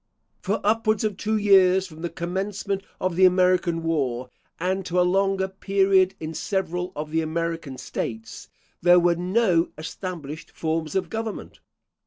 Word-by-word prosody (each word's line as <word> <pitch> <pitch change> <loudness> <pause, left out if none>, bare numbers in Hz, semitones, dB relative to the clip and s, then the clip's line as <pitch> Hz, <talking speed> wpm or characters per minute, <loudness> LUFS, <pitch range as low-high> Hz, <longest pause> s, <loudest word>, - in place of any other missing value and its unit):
For 205 +1 -1
upwards 215 0 +2
of 215 -2 0
two 215 +3 -1
years 190 -2 +5
from 160 -3 -12
the 170 - -2
commencement 195 +3 -3 0.2
of 185 -2 -1
the 185 +1 +6
American 180 -2 +3
War, 130 -6 -1 0.3
and 190 +3 -1
to 180 +1 +1
a - - +5
longer 195 +1 +1
period 190 -1 +2
in 160 0 -5
several 180 0 -2
of 150 +1 -5
the 160 0 +1
American 165 -3 -3
States, 110 -2 -6 0.3
there 175 +1 +6
were 175 0 +3
no 180 -1 +2
established 155 -2 -6
forms 160 -1 -3
of 190 - -1
government. 225 -1 -5
180 Hz, 150 wpm, -24 LUFS, 165-195 Hz, 0.3 s, the